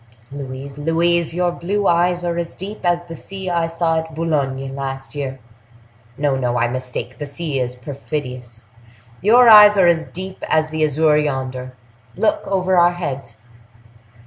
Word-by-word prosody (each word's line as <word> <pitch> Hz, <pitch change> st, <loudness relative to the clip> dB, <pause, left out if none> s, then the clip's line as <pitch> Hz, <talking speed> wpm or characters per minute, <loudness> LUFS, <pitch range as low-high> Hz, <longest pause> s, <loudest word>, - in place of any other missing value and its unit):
"Louise, 135 Hz, 0 st, -7 dB
Louise, 170 Hz, +2 st, +1 dB
your 175 Hz, +1 st, 0 dB
blue 200 Hz, +4 st, -2 dB
eyes 175 Hz, +1 st, +2 dB
are 170 Hz, -1 st, -1 dB
as 170 Hz, -1 st, -5 dB
deep 200 Hz, +3 st, -7 dB
as 175 Hz, -1 st, +1 dB
the 165 Hz, -1 st, -9 dB
sea 190 Hz, +2 st, -6 dB
I 170 Hz, -1 st, +1 dB
saw 165 Hz, -1 st, 0 dB
at 160 Hz, -1 st, -8 dB
Boulogne 135 Hz, -5 st, -2 dB
last 135 Hz, 0 st, -5 dB
year! 135 Hz, -2 st, -4 dB, 0.8 s
No, 145 Hz, -1 st, +1 dB
no, 125 Hz, -2 st, -1 dB
I 120 Hz, -, +2 dB
mistake—the 130 Hz, +2 st, -5 dB
sea 145 Hz, -1 st, -3 dB
is 125 Hz, 0 st, -2 dB
perfidious: 125 Hz, -3 st, -6 dB, 0.6 s
your 235 Hz, +6 st, +6 dB
eyes 210 Hz, -2 st, +9 dB
are 190 Hz, -, +5 dB
as 165 Hz, -2 st, +3 dB
deep 190 Hz, +1 st, -8 dB
as 155 Hz, 0 st, +1 dB
the 155 Hz, 0 st, 0 dB
azure 150 Hz, 0 st, +3 dB
yonder—look!—over 130 Hz, -, -2 dB
our 175 Hz, 0 st, +5 dB
heads!" 135 Hz, -9 st, -5 dB
155 Hz, 145 wpm, -19 LUFS, 135-175 Hz, 0.8 s, eyes